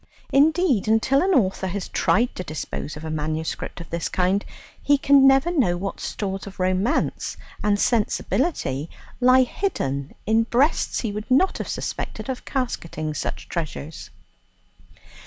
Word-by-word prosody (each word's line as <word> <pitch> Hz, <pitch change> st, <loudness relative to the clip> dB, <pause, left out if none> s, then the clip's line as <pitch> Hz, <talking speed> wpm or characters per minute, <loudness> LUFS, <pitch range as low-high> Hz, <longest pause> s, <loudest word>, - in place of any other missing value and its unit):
Indeed, 295 Hz, -, +3 dB
until 225 Hz, +5 st, +3 dB
an 375 Hz, 0 st, +2 dB
author 190 Hz, -4 st, +1 dB
has 190 Hz, +1 st, -4 dB
tried 240 Hz, +4 st, +1 dB
to 185 Hz, -, -5 dB
dispose 155 Hz, -1 st, -5 dB
of 155 Hz, -, -8 dB
a 160 Hz, -, -4 dB
manuscript 155 Hz, +2 st, -3 dB
of 170 Hz, -, -10 dB
this 170 Hz, -1 st, -2 dB
kind, 185 Hz, +2 st, +1 dB, 0.4 s
he 285 Hz, 0 st, +4 dB
can 275 Hz, -1 st, +6 dB
never 270 Hz, +5 st, +4 dB
know 235 Hz, -, +2 dB
what 195 Hz, +2 st, -4 dB
stores 195 Hz, -1 st, -4 dB
of 195 Hz, -, -11 dB
romance 185 Hz, +4 st, 0 dB, 0.3 s
and 205 Hz, -1 st, +2 dB
sensibility 210 Hz, -, 0 dB, 0.3 s
lie 255 Hz, +1 st, +6 dB
hidden 140 Hz, -, -3 dB
in 220 Hz, +2 st, +3 dB
breasts 265 Hz, +7 st, +1 dB
he 225 Hz, -, -2 dB
would 210 Hz, +1 st, -6 dB
not 275 Hz, +9 st, +3 dB
have -, -, -4 dB
suspected -, -, -4 dB
of 255 Hz, -, -4 dB
casketing 165 Hz, -, -3 dB
such -, -, -4 dB
treasures. 160 Hz, -2 st, -5 dB
205 Hz, 145 wpm, -23 LUFS, 170-265 Hz, 0.4 s, can